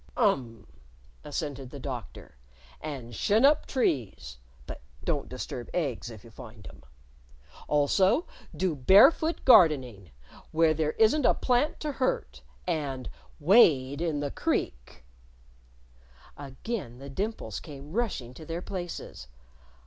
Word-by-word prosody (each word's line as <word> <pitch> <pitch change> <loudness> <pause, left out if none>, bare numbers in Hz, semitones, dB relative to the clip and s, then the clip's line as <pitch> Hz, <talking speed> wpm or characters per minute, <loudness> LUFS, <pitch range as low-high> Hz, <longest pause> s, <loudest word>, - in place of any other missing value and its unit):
"Um!" 130 - 0 0.6
assented 145 -3 -5
the 140 - -9
Doctor. 125 - -8 0.5
"And 135 -6 -7
shin 220 - +3
up 295 +2 +4
trees 110 - -2 0.3
(but - - -8 0.2
don't - - -2
disturb 120 - -6
eggs 140 -9 -2
if 110 -4 -11
you 115 - -15
find 110 -4 -12
'em). - - -12 0.9
Also 185 - +2 0.3
do 185 -4 0
barefoot 205 - +5
gardening, 130 - +5 0.4
where 160 0 +3
there 155 -1 -1
isn't 230 +7 +3
a - - +4
plant 255 +4 +1
to 300 - -2
hurt! 260 -2 -2 0.2
And 140 -7 -3 0.3
wade 145 - +4
the 145 -4 -2
creek." - - -3 1.3
Again 140 - -6
the 135 +1 -10
dimples 195 - -4
came 145 0 -11
rushing 190 - -2
to 160 - -11
their 165 +2 -5
places. 175 - -7
145 Hz, 120 wpm, -28 LUFS, 125-190 Hz, 1.3 s, barefoot